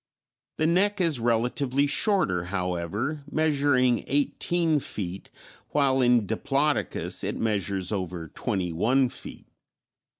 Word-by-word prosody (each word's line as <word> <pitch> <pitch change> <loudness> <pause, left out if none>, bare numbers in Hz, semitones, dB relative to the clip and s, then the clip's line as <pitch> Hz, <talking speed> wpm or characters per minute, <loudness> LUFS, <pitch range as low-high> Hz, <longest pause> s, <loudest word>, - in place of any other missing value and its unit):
The 155 - +1
neck 195 +5 +2
is 165 -8 +2
relatively 125 +4 +1
shorter, 145 - +2
however, 95 - -3
measuring 140 -6 +2
eighteen 155 +3 +1
feet, 95 -7 -5 0.4
while 135 -2 +2
in 120 -3 +4
Diplodocus 140 +8 -1
it - - -3
measures 100 -4 -1
over 90 -4 -4
twenty 90 +2 -3
one 125 +9 +2
feet. - - -8
125 Hz, 105 wpm, -26 LUFS, 100-145 Hz, 0.4 s, in